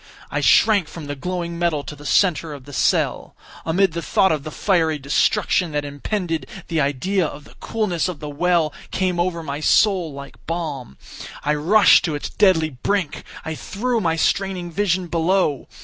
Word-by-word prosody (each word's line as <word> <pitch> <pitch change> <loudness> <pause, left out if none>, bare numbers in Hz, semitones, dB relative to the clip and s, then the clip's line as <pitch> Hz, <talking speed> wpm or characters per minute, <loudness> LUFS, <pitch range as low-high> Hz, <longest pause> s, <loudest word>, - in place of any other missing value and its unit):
I - - -1
shrank 205 -7 +4
from 160 -1 -9
the 145 0 -5
glowing 170 +2 -4
metal 165 -4 0
to 150 - -8
the 145 0 -9
centre 165 -4 +2
of 140 -3 -11
the 145 - -11
cell. - - 0 0.3
Amid 180 +2 +2
the 170 - -3
thought 190 +2 +2
of 155 -2 0
the 155 - -6
fiery 160 -3 +1
destruction 150 +4 +1
that 145 0 -1
impended, 165 +1 -3 0.2
the 165 -2 +1
idea 150 +8 0
of 150 -1 -5
the - - -17
coolness 210 -8 -1
of 180 -4 -5
the 150 - -6
well 160 +1 +1 0.2
came 185 -2 -1
over 175 -1 -1
my 145 -1 -4
soul 185 0 +3
like 140 0 -11
balm. 150 - -4 0.5
I 150 - +1
rushed 180 +9 +5
to 160 -4 -2
its 145 - -4
deadly 170 -6 +3
brink. 170 +6 -2 0.2
I 160 - -3
threw 230 +8 -2
my 165 -4 +1
straining 180 0 -1
vision 185 0 0
below. 170 -3 0
165 Hz, 180 wpm, -21 LUFS, 150-185 Hz, 0.5 s, rushed